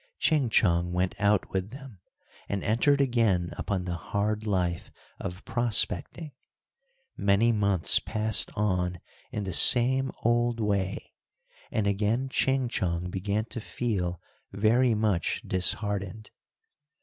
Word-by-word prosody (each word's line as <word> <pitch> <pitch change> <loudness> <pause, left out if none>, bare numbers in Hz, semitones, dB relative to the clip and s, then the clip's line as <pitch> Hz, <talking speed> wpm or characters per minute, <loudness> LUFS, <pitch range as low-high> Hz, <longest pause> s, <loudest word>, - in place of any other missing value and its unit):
Ching 150 -7 0
Chong 85 -4 +1
went 90 +1 -1
out 100 -1 0
with 95 +1 -3
them, 130 -5 -12 0.5
and 100 -1 -3
entered 140 +6 +1
again 115 -10 0
upon 95 -3 -4
the 90 - -4
hard 105 +5 -3
life 90 -4 -2 0.3
of 90 +2 -8
prospecting. 120 - -1 0.8
Many 100 +4 +1
months 100 -5 +3
passed 110 -1 +2
on 90 -4 -2 0.3
in 105 - -4
the 95 -2 -5
same 130 +2 +8
old 120 0 0
way, 100 -3 -3 0.6
and 110 - -2
again 105 +6 -1
Ching 135 -1 0
Chong 90 -5 -3
began 100 +3 -3
to 120 - -6
feel 95 -8 -4 0.3
very 115 +3 +1
much 105 -5 -1
disheartened. 100 +2 -2
105 Hz, 120 wpm, -26 LUFS, 95-120 Hz, 0.8 s, same